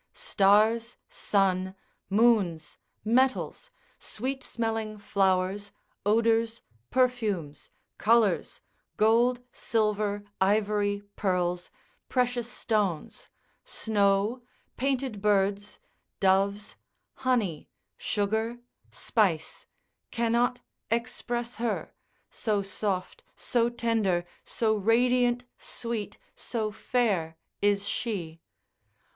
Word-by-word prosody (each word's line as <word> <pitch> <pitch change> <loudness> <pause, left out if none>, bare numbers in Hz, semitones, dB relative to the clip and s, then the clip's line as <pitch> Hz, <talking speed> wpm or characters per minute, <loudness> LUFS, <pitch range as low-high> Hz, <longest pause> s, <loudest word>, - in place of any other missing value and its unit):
Stars, 215 +4 +3
sun, 190 -2 +1 0.3
moons, 200 -6 +2 0.3
metals, 260 - +1 0.3
sweet 265 +3 -4
smelling 225 -2 -2
flowers, 195 0 0 0.4
odours, 230 +1 +2 0.3
perfumes, 220 - 0 0.3
colours, 220 -4 +2 0.4
gold, 240 +3 +3
silver, 210 -2 0 0.2
ivory, 205 0 +2
pearls, 180 -2 -1 0.4
precious 245 -2 0
stones, 205 -10 -2 0.3
snow, 205 +2 +1 0.3
painted 260 -5 -1
birds, 205 0 +1 0.4
doves, 200 +2 +1 0.4
honey, 230 - 0 0.3
sugar, 220 +3 -1 0.3
spice, 185 -9 0 0.4
cannot 235 +1 +1 0.3
express 240 +1 -2
her, 230 -2 -2 0.4
so 210 -3 0
soft, 195 - -3
so 235 -1 +1
tender, 225 -7 0 0.2
so 220 -2 0
radiant, 245 +3 +2
sweet, 230 -3 -5 0.2
so 220 -3 -3
fair 205 -8 0 0.2
is 205 0 +2
she. 170 -10 -3
215 Hz, 75 wpm, -28 LUFS, 195-235 Hz, 0.4 s, Stars